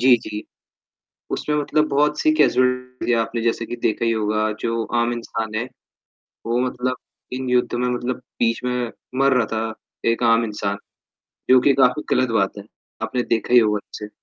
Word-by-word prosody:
जी, 125 0 +7
जी। 105 -2 -6 0.9
उसमें 150 - -1
मतलब 150 +1 +1
बहुत-सी 150 - +3
कैज़ुअल्टी 125 - +1
थीं 120 - +3
आपने 115 +1 -3
जैसे 115 0 0
कि 120 - -5
देखा 110 +1 -1
ही 115 - +2
होगा, 110 -1 0
जो 115 +1 -2 0.2
आम 120 +1 +1
इंसान 110 -2 -4
है, 115 +3 -1 0.8
वो 120 +1 +1
मतलब 125 +1 -2 0.4
इन 130 0 -3
युद्ध 125 -1 +2
में 125 +1 0
मतलब 125 +1 -2 0.2
बीच 115 +1 +1
में 125 -1 -1 0.3
मर 140 0 +4
रहा 120 -3 +2
था, 110 0 -3 0.4
एक 115 - -1
आम 115 0 +4
इंसान, 105 -2 -3 0.7
जो 130 - +8
कि 140 - +4
काफ़ी 130 +2 +3
गलत 130 0 +2
बात 100 -2 0
है। 100 - -7 0.4
आपने 125 - -1
देखा 115 0 -1
ही - - +10
होगा 105 -2 +2
उसे। 105 - -7
120 Hz, 175 wpm, -22 LUFS, 110-125 Hz, 0.9 s, ही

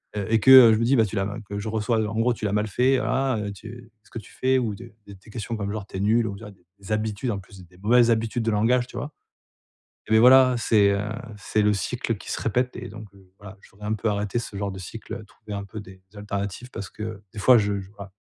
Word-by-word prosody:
heu, 100 -2 -2
et 115 0 +3
que, 120 - +2
heu, 125 -4 +10
je 110 - +1
me 115 - +1
dis: 130 +4 +3
«bah 115 -3 +4
tu 105 - -6
l'as» 95 0 0 0.2
que 100 0 -4
je 105 - -6
reçois, 110 +1 0
heu 110 - -1
en 110 - -5
gros 120 +2 +2
tu 110 - -6
l'as 100 - -1
mal 105 +1 0
fait. 125 +6 +2
Ah, 130 -1 0
heu, 105 -1 -4
tu 120 +4 -12
ce - - -24
que 115 - -6
tu 105 - -15
fais 130 0 +1
ou 115 -5 -1
de 120 +2 -12
des 100 - -11 0.2
questions 115 +1 -5
comme 100 -1 -3
genre 105 -3 -5
tu 95 - -8
es - - -4
nul 110 +3 +2
on 100 - -6
dirait 105 - -10
des 90 -2 -29
des 100 +2 -10
habitudes 110 +3 -1
en 100 - -3
plus, 95 -1 -14
des 90 - -23
mauvaises 120 +4 +4
habitudes 115 +1 0
de 115 - 0
langage, 120 +4 +2
tu - - -10
vois? 145 - -5 1.0
Et 110 - -3
beh 110 - +6
voilà, 130 +1 +7
c'est, 105 -3 +3
heu, 100 - 0 0.4
c'est 105 +2 0
le 105 0 +3
cycle 100 -5 -2
qui - - -10
se - - -2
répète 125 +3 -1
et - - -7
donc 110 0 -10
heu, 95 -2 -21
voilà 100 -1 -12
je - - -19
voudrais 105 +1 -11
un 110 - 0
peu 110 +1 -2
arrêter 105 +2 -2
ce 115 - -6
genre 100 0 -2
de 95 - -8
cycle. 110 +4 -8
Trouver 105 0 -10
un 100 0 -4
peu 105 +2 -8
des 95 -2 -14
alternatives 105 +3 -5
parce 100 - -7
que 110 -1 -7
des - - -8
fois 125 +4 +6
je 100 -1 -1
je 95 0 -12
voilà 100 -1 -10
110 Hz, 280 wpm, -24 LUFS, 100-115 Hz, 1.0 s, heu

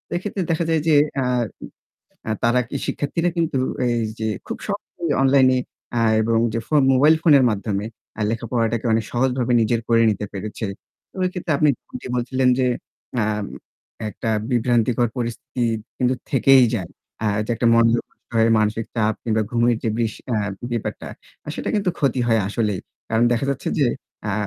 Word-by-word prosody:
এক্ষেত্রে 190 +2 -3
দেখা 165 +1 +1
যায় 160 -1 +2
যে 155 - +5 0.3
আ - - -1 1.0
অ্যা 110 - -1
তারা 120 +2 +3 0.3
শিক্ষার্থীরা 165 +4 -1
কিন্তু 165 -5 0 0.3
এই 120 -1 +1 0.2
যে 110 0 -1 0.2
খুব - - -4
সহজেই 180 -5 -3
অনলাইনে 130 -1 +5 0.4
আ - - +2 0.2
এবং 115 +1 +2
যে 115 - -1
ফোন 150 -2 +4
মোবাইল 145 +5 +6
ফোনের 145 -6 +6
মাধ্যমে 105 -1 -2 0.3
আ - - -4
লেখাপড়াটাকে 115 0 -1
অনেক 110 0 +1
সহজভাবে 125 0 +1
নিজের 115 +1 +1
করে 115 -1 +4
নিতে 105 0 -3
পেরেছে। 105 +3 -5 0.5
ওই 185 - +2
ক্ষেত্রে 180 -2 -5
আপনি 150 +1 +3 0.5
বলছিলেন 130 +1 +1
যে 130 - +2 0.6
আম 105 -1 -1 0.6
একটা 110 +1 -4 0.2
বিভ্রান্তিকর 120 0 +2
পরিস্থিতি 120 +1 -3 0.3
কিন্তু 125 0 +2 0.2
থেকেই 135 0 +6
যায়। 90 -6 -3 0.3
আ - - +2 0.2
যে - - -4
একটা 120 +1 0
মনযোগ 115 0 +4
করতে - - -39
হয়, 115 0 +4
মানসিক 110 +1 0
চাপ 110 -2 +1
কিংবা 110 -1 +1
ঘুমের 120 0 +2
যে 115 - 0
বিষ 115 -2 0 0.2
আ - - +1 0.3
ব্যাপারটা 120 -2 -4 0.5
সেটা - - -4
কিন্তু 200 -3 +1
ক্ষতি 135 -3 +1
হয় 115 -2 +3
আসলেই। 105 -3 -1 0.3
কারণ 115 +1 +3
দেখা 120 +3 0
যাচ্ছে 140 0 -3
যে 140 - +4 0.4
আ - - -1
120 Hz, 160 wpm, -22 LUFS, 110-135 Hz, 1.0 s, মোবাইল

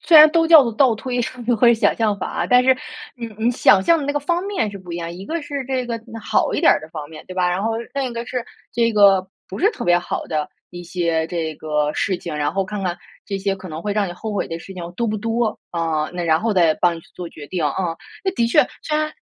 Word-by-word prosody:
虽 330 - +5
然 305 0 +10
都 330 0 +3
叫 320 -3 +9
做 235 - -2
倒 245 +1 +4
推， 245 +2 -3 0.4
或 240 - +5
者 235 - +7
想 220 -3 +2
象 215 -3 +1
法 - - -3
啊， - - -2
但 250 0 +5
是， 260 +1 +5 0.4
嗯， 230 -2 -7
你 230 +2 +2
想 205 -5 +4
象 335 +11 +4
的 290 - -3
那 285 - -1
个 290 - -1
方 345 +5 0
面 390 - -1
是 200 - -8
不 180 -2 -10
一 - - -3
样。 170 -1 -4
一 180 +3 -9
个 330 -1 -3
是 285 -2 -4
这 260 -2 -1
个 230 -1 -3 0.2
好 - - +1
一 - - 0
点 - - +6
儿 - - -1
的 155 - -11
方 150 -3 -7
面， 155 - -11
对 185 - -8
吧？ 180 -1 +1
然 180 +2 -1
后 225 +1 0 0.2
另 275 -1 0
一 250 - -3
个 235 0 -4
是， 250 -2 -3 0.3
这 230 -1 +2
个 195 -3 +5 0.2
不 190 - -7
是 410 +5 +3
特 445 - -6
别 175 0 +4
好 175 - -4
的 155 -2 -2 0.2
一 175 0 -8
些 170 -2 -1
这 165 -3 -3
个 150 -1 -1
事 190 -2 0
情， 170 -2 -6
然 145 0 0
后 195 -1 0
看 205 +1 -5
看 180 -2 -2 0.3
这 200 - -3
些 195 0 -1
可 185 -1 -10
能 155 +1 -6
会 205 - -1
让 205 -2 0
你 - - -5
后 215 +5 -6
悔 205 - -1
的 165 - -5
事 190 - -10
情 185 -2 -7
多 235 - 0
不 215 0 -1
多， 225 +1 -1
啊， 160 -3 -1
那 180 0 -3
然 160 -1 +3
后 220 -2 0
再 165 -4 +4
帮 175 +1 +2
你 - - -9
去 - - -21
做 175 -2 -6
决 150 -3 -11
定 175 -4 -2
啊。 165 +3 -1 0.3
那 380 - +2
的 235 -6 +1
确， 230 - +5 0.2
虽 305 - -1
然 305 0 -1
200 Hz, 305 characters per minute, -21 LUFS, 175-245 Hz, 0.4 s, 然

